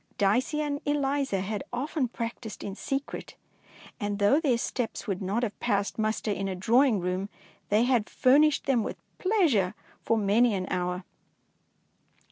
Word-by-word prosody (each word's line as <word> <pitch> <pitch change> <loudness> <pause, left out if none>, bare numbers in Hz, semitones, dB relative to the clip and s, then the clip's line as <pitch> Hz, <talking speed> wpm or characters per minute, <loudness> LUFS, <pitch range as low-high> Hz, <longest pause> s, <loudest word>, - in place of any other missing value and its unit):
Dicey 245 +9 +2
and 290 -1 -2
Eliza 280 -7 0
had 205 +4 -3
often 265 +2 -1
practised 230 -2 -6
in 200 - -4
secret, 275 +7 -4 0.6
and 205 -2 -2
though 205 +8 +4
their 275 -7 +2
steps 235 0 -3
would 195 -3 -2
not 200 +6 -1
have 215 -3 -3
passed 200 +2 0
muster 215 0 0
in 195 -1 -2
a 190 - -3
drawing 230 +4 +3
room, 180 +2 -2 0.4
they 210 +3 +4
had 245 -4 +2
furnished 285 +3 +4
them 265 -4 +2
with - - -4 0.2
pleasure 325 - +2 0.3
for 225 - +1
many 215 +2 +3
an 185 -1 -2
hour. 180 0 -1
225 Hz, 150 wpm, -28 LUFS, 200-270 Hz, 0.6 s, though